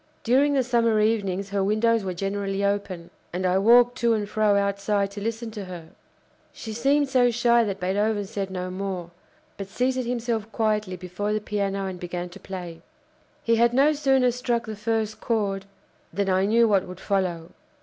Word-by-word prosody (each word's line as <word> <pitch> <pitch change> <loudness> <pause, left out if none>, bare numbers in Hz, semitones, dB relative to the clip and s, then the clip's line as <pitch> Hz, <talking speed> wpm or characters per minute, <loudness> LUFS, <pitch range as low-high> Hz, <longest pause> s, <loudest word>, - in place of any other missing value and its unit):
During 275 +4 +3
the 265 - +3
summer 230 -3 +2
evenings 200 -3 0
her 200 -1 0
windows 215 +2 +2
were 185 -2 -4
generally 195 +1 -2
open, 200 -4 -2 0.2
and 185 +2 -3
I 185 +1 +3
walked 240 +4 +5
to 235 -1 +3
and 210 -1 -2
fro 210 -1 +2
outside 200 0 0
to 200 0 -7
listen 225 +1 -3
to 210 -3 -6
her." 175 -3 -9 0.6
She 220 - -8
seemed 280 +5 +2
so 255 -2 +3
shy 235 0 +3
that 200 -3 -3
Beethoven 205 +3 0
said 195 0 -4
no 185 -1 -4
more, 185 -2 -4 0.5
but 195 - -6
seated 255 +4 -1
himself 230 -2 -2
quietly 215 -4 0
before 185 +4 -4
the 215 - 0
piano 200 -2 -2
and 185 -2 -5
began 175 0 -5
to 185 +3 -12
play. 175 -4 -8 0.6
He 230 0 +2
had 235 +1 +3
no 285 +3 +5
sooner 270 -4 +3
struck 240 -1 -1
the 220 -1 -6
first 215 0 -2
chord 200 -4 -1 0.5
than 200 +2 -1
I 190 +1 +2
knew 230 +2 +4
what 195 -3 +2
would 180 0 -9
follow. 180 -5 -2
205 Hz, 180 wpm, -25 LUFS, 195-230 Hz, 0.6 s, walked